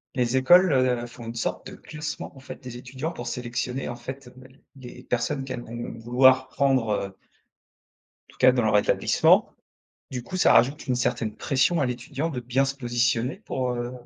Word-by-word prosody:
les 125 -1 0
écoles, 175 +7 +6
heu, 125 -2 +2
font 120 0 -11
une 115 - -6
sorte 115 - -3
de - - -10
classement 150 -1 -7
en - - -12
fait 130 - -9
des 125 -1 -8
étudiants 130 +6 -5
pour 120 -7 -7
sélectionner 125 +2 -3
en 120 - -4
fait, 130 +2 -9
bah, 130 0 -14 0.3
les 125 -1 -11
personnes 125 +4 -1
qu'elles 130 -2 -5
vont 120 +1 -7
vouloir 130 +2 +4
prendre, 130 -4 +1
heu 100 -2 -2 1.1
tout - - -20
cas 130 0 +6
dans 125 -2 0
leur 110 -1 +3
établissement. 100 - +3 0.6
Du 125 -2 -4
coup, 185 - -6
ça - - +5
rajoute 130 +6 +3
une 130 - +1
certaine 115 -3 -1
pression 140 +5 +1
à 140 - +2
l'étudiant 125 +6 -3
de 130 -5 -4
bien 125 +3 +1
se 135 0 -2
positionner 120 +1 0
pour, 125 -1 -2
heu, 120 0 -4
125 Hz, 190 wpm, -25 LUFS, 120-135 Hz, 1.1 s, écoles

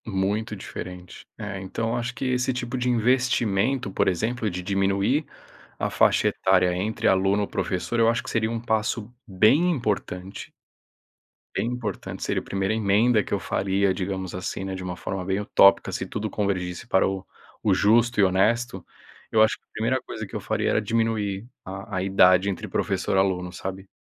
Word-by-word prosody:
Muito 105 +2 -1
diferente. 90 -2 -9
É, 105 -2 -5
então, 115 +5 -3
acho 120 +1 -3
que 125 - -4
esse 125 0 +1
tipo 125 0 -4
de 125 0 0
investimento, 120 -2 +1
por - - +1
exemplo, 110 +5 0
de 90 -1 -5
diminuir 100 - +1 0.5
a - - -1
faixa - - +3
etária 90 -1 +2
entre 105 +5 -1
aluno 95 +2 +2
professor, 95 +6 -2
eu 115 0 +5
acho 115 0 0
que - - -7
seria 110 -1 0
um 115 0 -2
passo 110 0 -1
bem 110 - +4
importante. 100 - -3 1.0
Bem - - 0
importante, 120 -5 -4
seria - - -1
a - - -17
primeira 95 +1 -1
emenda 110 +2 +3
que - - -6
eu - - +1
faria, 95 0 0
digamos 95 -1 -4
assim, 95 +1 -4
né, 95 0 -4
de 95 - -5
uma 90 -1 -4
forma 95 0 -4
bem 95 +2 0
utópica. 100 -1 +5
Se - - -3
tudo 105 +1 -4
convergisse 95 -1 -2
para 95 - +3
o 95 -1 -4 0.4
o 100 -3 +3
justo 110 +4 +3
e - - +6
honesto, 95 +2 +1 0.5
eu 110 -1 +5
acho 110 - +2
que - - -29
a - - -64
primeira 120 +4 0
coisa 110 -3 -6
que - - -11
eu - - -1
faria - - -1
era - - +2
diminuir 110 -2 -1 0.2
a 100 +1 -6
a 95 - 0
idade 95 0 +5
entre 95 - -4
professor - - -1
aluno, 90 -2 +1
sabe? 95 +1 -6
100 Hz, 180 wpm, -25 LUFS, 95-115 Hz, 1.0 s, e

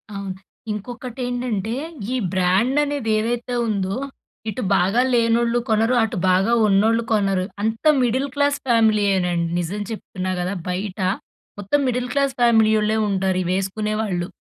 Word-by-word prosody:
అవును. 195 -1 -5 0.4
ఇంకొటేంటంటే, 245 0 -4 0.4
ఈ - - 0 0.2
బ్రాండనేది 235 +8 +1
ఏదైతే 240 +2 -2
ఉందో, 195 -3 -1 0.5
ఇటు 215 +4 -4
బాగా 195 +7 +3
లేనోళ్ళు 235 0 +2
కొనరు, 225 +3 +2
అటు 225 - -2
బాగా 190 +5 +3
ఉన్నోళ్ళు 220 +4 +3
కొనరు. 195 -3 +1 0.2
అంతా 225 +8 +1
మిడిల్ 255 +3 +1
క్లాస్ 285 0 +2
ఫ్యామిలీయేనండి 200 -7 +2
నిజం 180 +5 -3
చెప్తున్నా 185 -4 -5
గదా! 185 +3 -2
బయట 190 +2 -4 0.6
మొత్తం 205 +9 +1
మిడిల్ 250 0 -1
క్లాస్ 275 -1 +1
ఫ్యామిలీ 225 -2 +5
ఓళ్ళే 215 +1 +1
ఉంటారు 190 -1 0
ఇవేసుకునే 195 +4 -1
వాళ్ళు. 180 -5 -2
215 Hz, 125 wpm, -21 LUFS, 190-240 Hz, 0.6 s, ఫ్యామిలీ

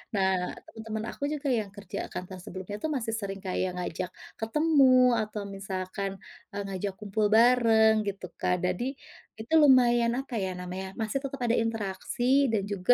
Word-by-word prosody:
Nah, 190 -2 +1 0.2
temen-temen 220 -1 -6
aku 285 - -3
juga 295 -1 -3
yang 220 -5 0
kerja 200 -3 -6
kantoran 185 +1 -6
sebelumnya 190 +2 -7
tuh 315 - 0
masih 235 -6 -2
sering 200 -3 -4
kayak 185 -1 -2
ngajak 180 +1 -4 0.3
ketemu 255 -1 +4
atau 215 0 -5
misalkan, 195 0 -4 0.4
eee, 205 - -4
ngajak 195 +1 -3
kumpul 210 +1 0
bareng, 220 -2 +5
gitu, 195 -2 -4
Kak. 180 -1 0
Jadi 240 +10 -1 0.4
itu 225 +8 -6
lumayan, 245 -6 +6
apa 270 -2 -6
ya 185 - -2
namanya, 180 +1 -6
masih 220 +4 -1
tetep 275 0 -5
ada 240 -1 +1
interaksi 230 +4 +1
dan 210 -3 +1
juga 200 +3 +3
215 Hz, 160 wpm, -28 LUFS, 190-245 Hz, 0.4 s, lumayan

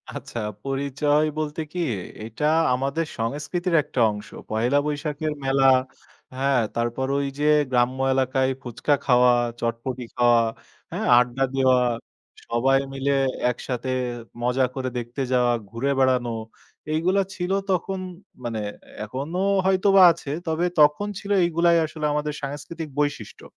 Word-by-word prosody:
আচ্ছা, 120 - -6 0.2
পরিচয় 140 +2 +1
বলতে 155 0 -2
কি, 180 - -5 0.4
এটা 115 +6 -4 0.3
আমাদের 140 +6 -1
সংস্কৃতির 150 +9 -2
একটা 130 - -5
অংশ। 105 +1 -8 0.2
পহেলা 120 +6 +1
বৈশাখের 150 +1 -2
মেলা, 135 0 +3 0.7
হ্যাঁ, 135 -1 +2
তারপর 120 +3 -1
ওই 140 0 0
যে 150 - 0 0.3
গ্রাম্য 125 +1 +1
এলাকায় 130 0 +1
ফুচকা 125 +4 -1
খাওয়া, 125 -1 +5 0.3
চটপটি 120 +2 -3
খাওয়া, 120 -1 +4 0.5
হ্যাঁ, - - -2
আড্ডা 125 +2 +2
দেওয়া, 130 -1 +4 0.7
সবাই 135 +3 +2
মিলে 135 +1 -1 0.4
একসাথে 125 +1 -5 0.5
মজা 125 +2 +2
করে 130 -1 -2
দেখতে 120 +3 -5
যাওয়া, 125 -1 +3 0.2
ঘুরে 120 +6 -1
বেড়ানো 130 -2 +2 0.6
এইগুলা 180 +5 +2
ছিল 180 +1 -3 0.2
তখন। 190 +1 -1 0.4
মানে 115 -2 -3 0.4
এখনো 135 - -5 0.3
হয়তোবা 190 +1 +4
আছে, 165 -3 -7 0.2
তবে 160 +2 0
তখন 150 +7 +4
ছিল, 205 - -6
এইগুলাই 170 0 +3
আসলে 155 0 -5
আমাদের 150 0 -1
সাংস্কৃতিক 150 +3 -6
বৈশিষ্ট্য। 145 -1 -2
135 Hz, 125 wpm, -24 LUFS, 125-155 Hz, 0.7 s, খাওয়া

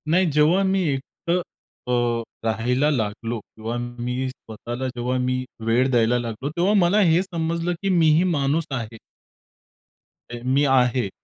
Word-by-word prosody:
नाही, 185 +4 +4
जेव्हा 150 +6 +4
मी 190 0 +1
एकटं 145 +6 -2 0.5
अ, 120 -1 +1 0.2
राहायला 125 +6 +1
लागलो 115 -1 -2
किंवा 110 +3 -6
मी 120 +1 -3
स्वतःला 120 +1 -6
जेव्हा 125 0 -2
मी 125 0 0 0.2
वेळ 120 +3 +2
द्यायला 120 0 +3
लागलो; 120 +3 -4
तेव्हा 175 +6 +1
मला 195 0 +4
हे 175 -3 +4
समजलं 170 -1 -2
की 195 - -1
मी 170 -4 +4
ही 170 - +3
माणूस 155 -2 +1
आहे. 115 -4 -4 1.3
अ, 120 - -6
मी 135 +3 +2
आहे, 125 -4 +2
130 Hz, 145 wpm, -23 LUFS, 120-165 Hz, 1.3 s, नाही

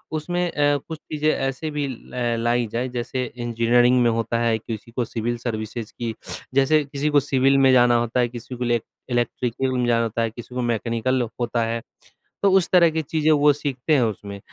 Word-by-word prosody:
उसमें 175 +3 -1
अ, 145 -1 +2
कुछ 160 - -5
चीज़ें 155 0 -2
ऐसे 135 +3 -2
भी 145 -1 -2
ल 120 -2 -3
लाई 120 0 +2
जाए 120 +2 -1
जैसे 125 +1 -3
इंजीनियरिंग 120 +1 +3
में 120 - +4
होता 115 0 -1
है, 115 -1 +2
किसी 110 +1 -7
को 120 0 -1
सिविल 120 +1 -3
सर्विसेज़ 115 -1 -5
की 115 -2 -2 0.4
जैसे 140 +3 +4
किसी 140 +2 -2
को 145 - +5
सिविल 135 -1 +2
में 135 -1 +5
जाना 120 -1 +5
होता 120 +1 -1
है, 120 - +3
किसी 120 +1 -8
को 125 - -4
इले 120 -1 +2 0.3
इलेक्ट्रिकल 120 +2 -1
में 125 - +1
जाना 115 -1 +3
होता 115 +1 -2
है, 115 -1 0 0.3
मैकेनिकल 120 +2 0 0.2
होता 120 -1 0
है 115 0 -2 0.6
तो 200 - +6
उस 190 -2 +3
तरह 175 -2 +6
की 160 0 -1
चीज़ें 155 +1 +1
वो 150 0 +5
सीखते 140 +1 -2
हैं 130 - +3
उसमें। 100 -2 -4
125 Hz, 195 wpm, -23 LUFS, 115-140 Hz, 0.6 s, तो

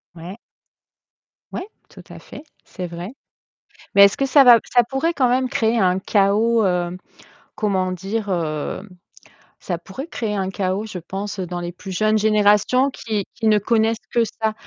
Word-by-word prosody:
Ouais. 175 +4 -9 1.1
Ouais! 370 - -5 0.2
Tout - - -14
à - - -10
fait, 285 - -12 0.2
c'est 180 -3 -7
vrai. 170 +2 -7 0.9
Mais 200 0 +9
est-ce 200 - +1
que 275 - +1
ça 275 +1 +6
va 245 -2 +8 0.2
ça 245 - +6
pourrait 305 +6 0
quand 255 -5 +2
même 255 +1 +1
créer 225 +1 +1
un 185 -2 +2
chaos, 215 +3 +2
heu 180 -1 -1 0.6
comment 190 -3 -1
dire, 200 +4 -4
heu 160 -2 -3 0.8
ça 175 - -3
pourrait 255 - -9
créer 225 -9 -3
un 190 -1 -2
chaos, 195 +2 -2
je 195 -4 -7
pense, 195 +4 -6
dans 180 -1 -5
les 175 0 -6
plus 190 +2 -9
jeunes 215 +4 +1
générations 215 +5 +3
qui 215 -6 -4
qui 225 - -1
ne 215 -1 +5
connaissent 220 +2 +1 0.2
que 235 - +3
ça. 220 0 -3
205 Hz, 170 wpm, -21 LUFS, 185-230 Hz, 1.1 s, Mais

